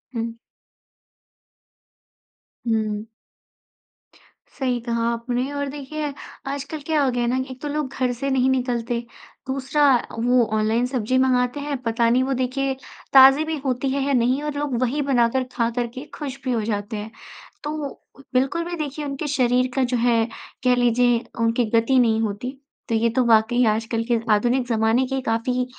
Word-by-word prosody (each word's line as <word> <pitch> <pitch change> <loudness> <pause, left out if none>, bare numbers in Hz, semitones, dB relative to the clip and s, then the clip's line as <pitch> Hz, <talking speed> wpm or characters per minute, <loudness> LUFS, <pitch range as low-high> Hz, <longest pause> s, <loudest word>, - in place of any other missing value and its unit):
हुँ। 230 0 -2 2.3
हुँ। 215 -2 0 1.5
सही 250 -3 0
कहा 235 -1 -1
आपने। 245 +3 -2
और 285 0 -2
देखिए, 290 +1 -5 0.3
आजकल 280 +3 -4
क्या 310 -2 +2
हो 265 - +2
गया 245 0 -1
है - - 0
ना, 255 - +1
एक 260 +1 -10
तो 295 - -4
लोग 295 0 -1
घर 255 -1 +2
से 275 +3 -3
नहीं 265 -1 +2
निकलते, 245 -2 0 0.5
दूसरा 270 +2 +1
अ, 240 - -3
वो 245 +1 +4
ऑनलाइन 220 +3 +1
सब्ज़ी 250 -1 0
मँगाते 255 +1 +2
हैं। 285 0 -3
पता 230 0 +2
नहीं 250 +2 +3
वो 270 +1 0
देखिए 265 +1 -1 0.4
ताज़ी 270 +2 +8
भी 320 0 -2
होती 260 +1 0
है 275 +1 0
है 280 +1 0
नहीं, 250 +2 +2
और 300 0 -2
लोग 290 -3 -1
वही 255 +4 0
बनाकर 260 -2 +2
खा 230 -2 +1
कर 240 -1 +1
के 260 +3 -6
खुश 275 -3 -6
भी 260 - -1
हो 235 -2 +1
जाते 210 0 -3
हैं। 210 +1 -6 0.5
तो 295 - -3 0.2
उ - - -10 0.4
बिल्कुल 270 +7 +1
भी 345 0 -4
देखिए 300 -1 -4
उनके 280 +2 -4
शरीर 255 -3 +2
का 265 - +2
जो 250 0 0
है, 230 -1 +3 0.4
कह 250 -1 +4
लीजिए 245 0 +3 0.2
उनकी 230 +1 +2
गति 230 +4 +3
नहीं 225 -2 +3
होती। 220 +3 -3 0.4
तो 230 - +1
ये 230 +1 +2
तो 255 +3 +1
वाक़ई 235 +2 +4
आजकल 225 +1 0
के 235 - +3
आधुनिक 245 +4 +2
ज़माने 225 +2 +2
की 270 0 -2
काफ़ी 250 +1 0
250 Hz, 175 wpm, -23 LUFS, 230-270 Hz, 2.3 s, ताज़ी